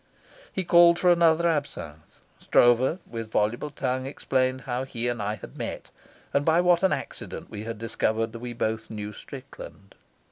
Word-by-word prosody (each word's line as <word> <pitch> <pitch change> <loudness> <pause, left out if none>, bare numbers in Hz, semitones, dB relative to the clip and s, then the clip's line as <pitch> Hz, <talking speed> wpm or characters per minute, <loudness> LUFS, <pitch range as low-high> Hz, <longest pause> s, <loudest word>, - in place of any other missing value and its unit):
He 190 - -2
called 170 0 +6
for 180 0 +4
another 170 -1 +4
absinthe. 140 - -4 0.2
Stroeve, 120 +6 +4
with 115 -1 -6
voluble 110 +7 0
tongue, 130 -2 -2
explained 130 -1 0
how 125 0 -3
he 120 -3 -4
and 120 -2 -2
I 105 +1 -1
had 105 - -12
met, - - -5 0.4
and 140 - +2
by 160 +2 +3
what 175 -1 +4
an 190 - +3
accident - - -5
we 110 +2 -5
discovered 115 0 -1
that 115 - -8
we 120 0 -6
both 110 -1 -2
knew 105 -1 -6
Strickland. 130 -6 -11
125 Hz, 165 wpm, -26 LUFS, 110-160 Hz, 0.4 s, called